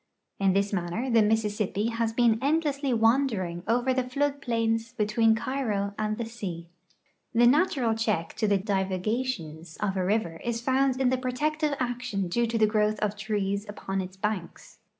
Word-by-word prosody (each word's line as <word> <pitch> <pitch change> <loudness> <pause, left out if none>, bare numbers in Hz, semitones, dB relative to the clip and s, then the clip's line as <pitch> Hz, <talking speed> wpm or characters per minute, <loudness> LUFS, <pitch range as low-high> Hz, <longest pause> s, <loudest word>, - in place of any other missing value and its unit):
In 195 -1 +3
this 200 +1 +1
manner 195 +8 -2
the 230 -1 +5
Missis.sipj)i 210 0 0
has 230 -1 0
been 230 -1 +3
endlessly 285 -1 +1
wandering 225 -7 +1
over 245 +3 +2
the 255 0 +1
flood 280 +2 0
plains 230 -2 -1
between 220 0 +3
Cairo 220 -6 -2
and 215 0 -1
the 235 - -3
sea. 185 -7 -6 0.7
The 240 +1 +6
natural 265 -4 +3
check 215 -7 -1
to 215 - +1
the 200 -1 +3
divagations 190 -3 -2
of 200 -2 -1
a 185 - 0
river 180 -4 -1
is 235 -1 -1
found 260 +1 +1
in 260 -2 +3
the 260 - +1
protective 295 +4 -1
action 245 -7 -2
due 235 +6 +1
to 230 0 -1
the 220 - +5
growth 215 0 +1
of 210 -1 -1
trees 205 -1 -2
upon 195 -2 -3
its 185 +1 -8
banks. 200 -3 -4
225 Hz, 170 wpm, -27 LUFS, 200-250 Hz, 0.7 s, The